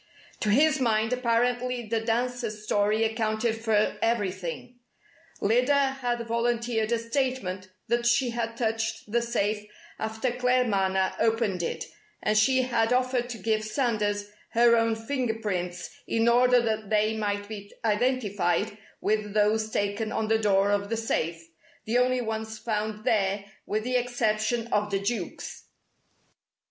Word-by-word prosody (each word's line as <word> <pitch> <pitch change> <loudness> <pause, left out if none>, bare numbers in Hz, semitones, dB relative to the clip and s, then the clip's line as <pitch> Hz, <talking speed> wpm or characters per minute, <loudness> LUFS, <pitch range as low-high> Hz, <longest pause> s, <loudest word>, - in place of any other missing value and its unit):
To 210 - 0
his 305 +7 +4
mind 225 -1 +2
apparently 245 0 0
the 225 +1 0
dancer's 230 -1 -2
story 215 +1 +2
accounted 220 0 0
for 220 -2 +1
everything. 205 0 -2 0.6
Lyda 270 +5 +2
had 240 -1 -1
volunteered 235 -1 0
a 235 - +3
statement 230 -6 -2 0.2
that 240 0 +1
she 245 +1 +3
had 230 -1 -3
touched 225 -2 -2
the 235 +1 +2
safe 215 -3 -1 0.4
after 220 +3 -1
Claremanagh 220 -7 +1
opened 225 -5 +1
it, 160 -1 -3 0.4
and 215 - +2
she 255 +5 +4
had 235 -2 +1
offered 250 -1 +1
to 240 - -5
give 220 -1 0
Sanders 210 -4 -1 0.2
her 235 0 +6
own 230 -1 +2
fingerprints 220 -8 -3 0.2
in 225 0 +1
order 250 +1 +5
that 220 -3 -1
they 215 +1 +2
might 205 -1 -2
be 205 -1 -8
identified 210 -3 0 0.2
with 210 0 -1
those 215 +1 +2
taken 205 +1 -1
on 215 - -1
the 220 0 +3
door 200 -1 +3
of 200 0 0
the 230 - -1
safe, 165 -7 -2 0.4
the 235 +3 +2
only 255 0 +2
ones 220 -1 -4
found 215 0 -3
there 200 -4 +1 0.2
with 215 +1 -1
the 250 +1 +1
exception 230 -2 0
of 210 0 +1
the 195 -1 0
Duke's. 200 -2 -4
225 Hz, 140 wpm, -27 LUFS, 210-240 Hz, 0.6 s, her